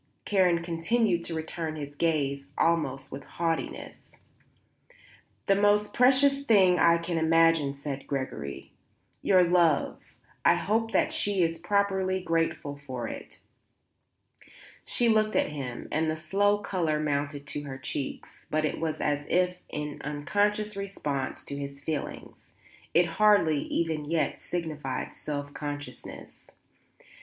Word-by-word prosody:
Karen 180 -4 +3
continued 175 +2 +1
to 165 - -4
return 160 0 -4
his 145 -2 -6
gaze 140 -4 0
almost 140 -5 +1
with 135 - -7
haughtiness. 165 -1 -4 1.3
"The 195 - +4
most 205 +1 +3
precious 275 +2 +5
thing 195 -8 +4
I 170 0 +6
can 170 0 -2
imagine," 165 -3 +3
said 140 -1 -6
Gregory. 130 - -5 0.5
"Your 185 -2 +5
love. 170 -4 +1 0.3
I - - +6
hope 225 +2 0
that - - +2
she 200 -3 +1
is 165 0 -1
properly 190 0 +1
grateful 165 -4 -1
for 130 -4 -5
it." - - -9 1.4
She 240 - +1
looked 215 -1 +3
at - - +2
him 135 -5 -6
and 160 +1 +1
the 155 - -1
slow 200 +6 +2
colour 170 -7 -1
mounted 145 -1 -2
to 145 - -4
her 135 -2 -6
cheeks; 135 +1 -6
but 155 0 +1
it 150 - -2
was 160 -1 -2
as 145 0 -1
if 180 0 +1
in 150 -1 -5
unconscious 205 +8 0
response 150 -9 -3
to 140 - -6
his 140 0 -6
feeling; 150 +1 -4 0.6
it 170 +1 +6 0.2
hardly, 200 -8 +5
even 160 -3 -1
yet, 165 -1 0
signified 150 -7 -4
self 145 -1 -5
consciousness. 145 -1 -8
165 Hz, 130 wpm, -28 LUFS, 145-190 Hz, 1.4 s, I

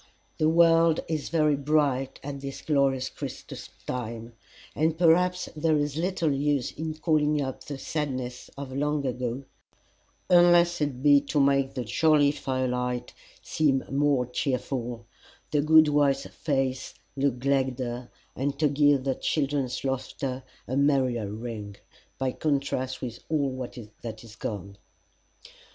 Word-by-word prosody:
The 155 - +4
world 165 0 +5
is 155 -2 -2
very 155 -3 +3
bright 140 -2 0
at 140 0 -6
this 135 0 -7
glorious 135 -3 +1
Christmas - - -8 0.2
time, 115 -1 -5 0.4
and 160 +1 +1
perhaps 180 +2 +3
there 155 0 +2
is 145 -1 -1
little 170 -1 0
use 140 -2 0
in 155 0 -5
calling 150 -2 +2
up 130 -2 -4
the 145 - -5
sadness 130 -5 -4
of 140 -1 -6
long 145 0 0
ago, 125 0 -3 0.8
unless 175 -1 +5
it 135 -3 -2
be 145 -1 +6
to 145 +1 0
make 140 -1 +2
the 125 - -2
jolly 145 +4 +4
fire 130 -3 -2
light 125 0 -2 0.3
seem 140 -4 +1
more 140 -2 +2
cheerful, 125 -2 -3 0.5
the 150 -2 +2
good 155 +1 +6
wife's 145 -2 +2
face 135 -3 -2 0.2
look 135 -2 +1
gladder, 130 -2 -1 0.3
and 140 +2 -2
to 150 -1 +3
give 145 -1 +3
the 135 0 +1
children's 140 -3 -1
laughter 130 0 -3 0.3
a 130 - -2
merrier 130 -6 +2
ring, 110 -2 -6 0.4
by 130 -1 0
contrast 135 -3 -2
with 120 -2 -5
all 140 -4 0 0.5
that 110 -1 -7
is 110 -2 -13
gone. 100 -4 -6
140 Hz, 135 wpm, -27 LUFS, 125-150 Hz, 0.8 s, be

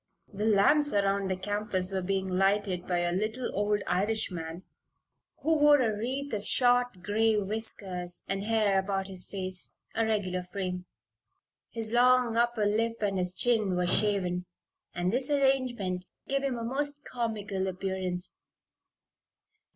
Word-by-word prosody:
The 205 +2 -2
lamps 285 +8 +4
around 200 -1 +1
the 185 - +1
campus 195 -1 -2
were 190 -1 -1
being 190 +1 -1
lighted 195 0 +1
by 175 -1 +1
a 175 0 +1
little 215 +7 -2
old 205 0 +1
Irishman, 180 -3 -2 0.8
who 320 +1 +3
wore 295 0 +7
a 225 -4 +1
wreath 260 +5 -3
of 205 -1 -2
short, 245 -5 +2
gray 220 +2 +2
whiskers 195 -4 -4
and 195 0 -1
hair 210 -3 +3
about 195 0 -2
his 185 -1 -5
face 185 -2 -2 0.2
a 225 - +1
regular 200 -5 0
frame. 180 0 -4 0.8
His 225 -1 -3
long 250 -1 +4
upper 235 -2 +2
lip 225 +2 0
and 195 -2 +1
his 180 0 0
chin 215 -2 +1
were 180 0 +1
shaven, 180 -2 +1 0.5
and 180 +3 0
this 255 +2 -1
arrangement 250 -10 +1 0.2
gave 275 0 0
him 270 -3 -1
a 230 - -4
most 285 +4 -3
comical 210 -5 -2
appearance. 185 -1 -3
205 Hz, 145 wpm, -29 LUFS, 185-230 Hz, 0.8 s, wore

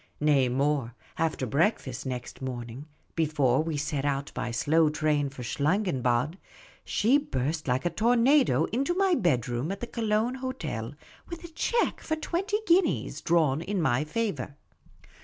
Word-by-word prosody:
Nay, 145 -4 +3
more; 135 -2 0 0.2
after 160 -5 0
breakfast 140 - 0
next 125 0 -6
morning, 125 +1 -6 0.3
before 145 -5 +2
we 160 -1 -2
set 145 -1 -2
out 140 0 -1
by - - -3
slow 150 +6 +3
train 150 -2 0
for 135 -2 -9
Schlangenbad, 145 - 0 0.4
she 245 +7 +3
burst 150 - -3
like 130 +5 0
a 175 - +1
tornado 245 - +3
into 275 +9 0
my 385 -1 +3
bedroom 130 - 0
at 195 - -4
the - - -4
Cologne 225 0 0
hotel 145 - -4 0.3
with 340 -1 -7
a 340 - -8
cheque 465 +8 0
for 315 - -1
twenty 370 +6 -1
guineas, 365 0 +2
drawn 160 -4 +2
in 200 +3 -2
my 135 -3 +2
favour. 155 - -3
155 Hz, 145 wpm, -28 LUFS, 130-225 Hz, 0.4 s, Nay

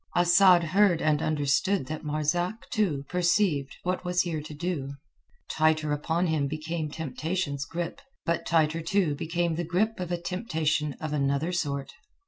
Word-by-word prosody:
Asad 175 0 +6
heard 180 +1 +3
and 155 -1 +2
understood 155 +4 +1
that 155 +3 -6
Marzak, 160 +7 -1
too, 175 - 0
perceived 175 -5 +1
what 180 0 -1
was 180 0 +1
here 165 -4 -3
to 150 +1 -9
do; 145 -4 -3 0.5
tighter 155 -1 +2
upon 165 +4 0
him 155 -4 +1
became 155 +1 -3
temptation's 150 0 -3
grip; 170 +2 -5 0.2
but 170 0 0
tighter, 160 0 +2
too, 170 -1 +1
became 170 +3 -1
the 175 - -1
grip 185 +7 0
of 180 -1 -4
a 175 - -1
temptation 160 -5 -1
of 155 +1 -5
another 140 +3 0
sort. 140 -6 -2
160 Hz, 150 wpm, -27 LUFS, 150-180 Hz, 0.5 s, Asad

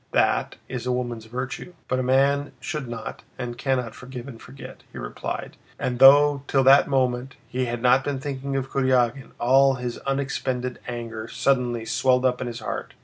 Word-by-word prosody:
That - - +2
is 125 0 -5
a - - +1
woman's 120 -3 -3
virtue. 125 +9 -6
But 130 - 0
a - - +1
man 140 +2 +2
should 145 0 -4
not 115 -1 -6 0.2
and 120 -1 -4
cannot 125 -3 -1
forgive 125 +1 -9
and 120 -5 -10
forget," 65 +1 -11
he - - -10
replied, - - -5 0.2
and 125 -1 -2
though 140 +1 +7
till 135 -1 +3
that 135 +1 +7
moment 130 -1 0
he 130 +1 -1
had 120 0 -4
not 130 +2 +5
been 140 -1 -2
thinking 140 0 -4
of 135 -1 -2
Kurágin, 130 -1 +1
all 135 +2 +5
his 125 -1 -5
unexpended 130 -2 -2
anger 115 -2 -5
suddenly 120 -4 0
swelled 125 +2 +2
up 125 -1 +1
in 125 - -2
his 120 -1 -6
heart. - - -5
125 Hz, 180 wpm, -24 LUFS, 120-135 Hz, 0.2 s, though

